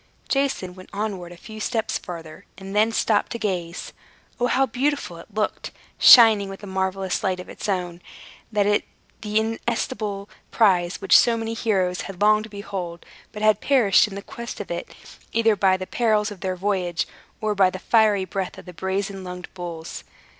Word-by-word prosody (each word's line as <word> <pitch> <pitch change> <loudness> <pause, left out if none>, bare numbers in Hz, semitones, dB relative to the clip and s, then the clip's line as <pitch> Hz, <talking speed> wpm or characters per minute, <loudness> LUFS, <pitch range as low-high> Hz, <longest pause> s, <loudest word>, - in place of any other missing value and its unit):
Jason 270 -10 0
went 185 0 -13
onward 195 -4 -4
a 175 - -11
few 215 +4 -10
steps 220 0 -1
farther, 165 0 -9
and 195 +1 -8
then 215 +2 +4
stopped 215 -2 +1
to - - -3
gaze. 180 -6 -3 0.5
O, 245 - +2
how 270 +2 +3
beautiful 260 - -2
it 170 - -13
looked, 210 +1 -2 0.3
shining 220 -5 +8
with 195 +2 -9
a - - -5
marvelous 190 +1 -2
light 185 -2 0
of 180 - -8
its - - -6
own, 180 -2 -2 0.5
that 205 -1 +2 0.4
inestimable 210 -1 -2 0.2
prize 180 -5 +2
which - - +4
so 235 -1 +6
many 225 0 -3
heroes 190 -6 0
had 195 -3 -8
longed 215 +1 +4
to - - -12
behold, 190 -4 -6 0.3
but 210 0 -6
had 215 0 +4
perished 240 -10 +4
in 200 - -9
the 200 - -6
quest 235 -1 -8
of 205 - -6
it, 170 - -4 0.4
either 225 -1 +3
by 190 -1 +3
the 185 - -5
perils 215 -1 +1
of 200 - -9
their 185 -1 -2
voyage, 185 -3 -1 0.3
or 215 -1 0
by 195 -2 +4
the 185 - -6
fiery 210 -1 +3
breath 185 0 -4
of - - -11
the 180 - -10
brazen 190 +2 -3
lunged 180 -1 -8
bulls. 170 -3 -7
200 Hz, 180 wpm, -23 LUFS, 185-220 Hz, 0.5 s, shining